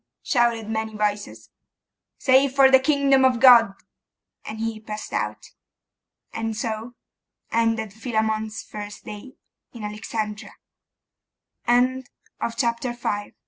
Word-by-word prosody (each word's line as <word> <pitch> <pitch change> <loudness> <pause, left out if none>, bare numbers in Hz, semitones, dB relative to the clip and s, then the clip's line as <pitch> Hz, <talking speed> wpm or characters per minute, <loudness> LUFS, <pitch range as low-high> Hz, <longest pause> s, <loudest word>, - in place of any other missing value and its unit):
shouted 235 -3 +1
many 220 0 -3
voices. 210 -1 -3 0.7
'Say 265 +1 +4
for 270 0 +4
the 265 - +8
kingdom 275 -1 +3
of 255 -2 +3
God.' 235 -6 +7 0.7
And 220 +1 -7
he 225 -1 -3
passed 215 0 -7
out. - - -3 0.8
And 225 -1 -3
so 225 +2 -4 0.6
ended 225 -2 0
Philammon's 220 -1 -2
first 205 0 -9
day 210 +5 -9 0.4
in 235 -3 -9
Alexandria. 210 0 -5 2.0
CHAPTER 235 0 -1
V 205 -4 -4
225 Hz, 100 wpm, -23 LUFS, 215-245 Hz, 2.0 s, the